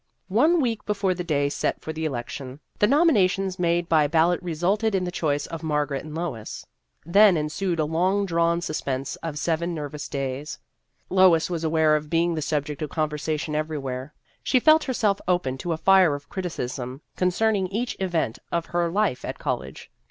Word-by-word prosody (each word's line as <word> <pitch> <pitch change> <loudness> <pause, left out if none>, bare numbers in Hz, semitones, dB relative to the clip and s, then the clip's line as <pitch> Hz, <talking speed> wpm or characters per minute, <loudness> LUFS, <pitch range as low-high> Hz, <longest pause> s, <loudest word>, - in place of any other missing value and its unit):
One 305 - +4
week 230 -6 -1
before 200 -3 +1
the 180 0 -4
day 145 -4 +1
set 145 - -2
for 160 - -6
the 160 0 -3
election, 130 0 -5 0.2
the 210 - +5
nominations 200 - +3
made 175 0 +1
by 155 -3 +4
ballot 165 +3 +2
resulted 190 +6 0
in 185 - +1
the 180 - -3
choice 145 -4 -1
of 165 -1 -7
Margaret 150 -3 -1
and 155 0 -8
Lois. 155 -11 -5 0.4
Then 195 +2 +6
ensued 165 +4 -2
a 155 - +2
long 185 +6 +1
drawn 170 -1 +1
sus 155 -3 -3
pense 135 0 -3
of 160 -3 -5
seven 170 +2 -1
nervous 150 -1 -6
days. 135 +1 -4 0.5
Lois 180 -3 +4
was 165 -2 -2
aware 160 -1 +3
of 150 0 -3
being 170 +1 +2
the 160 - -2
subject 150 -1 -2
of 155 - -3
conversa 155 0 -2
tion 150 0 -4
everywhere; 145 -3 -3 0.3
she 255 - +2
felt 310 +4 +5
herself 215 -6 0
open 175 -8 +1
to 175 - -3
a 160 - 0
fire 185 -3 +5
of 145 0 -10
criticism 130 -7 -5
concerning 190 +2 +1
each 225 +6 -3
event 175 -11 -1
of 170 -1 -1
her 175 -1 0
life 195 -6 0
at - - -5
college. 65 +2 -5
165 Hz, 180 wpm, -25 LUFS, 150-185 Hz, 0.5 s, Then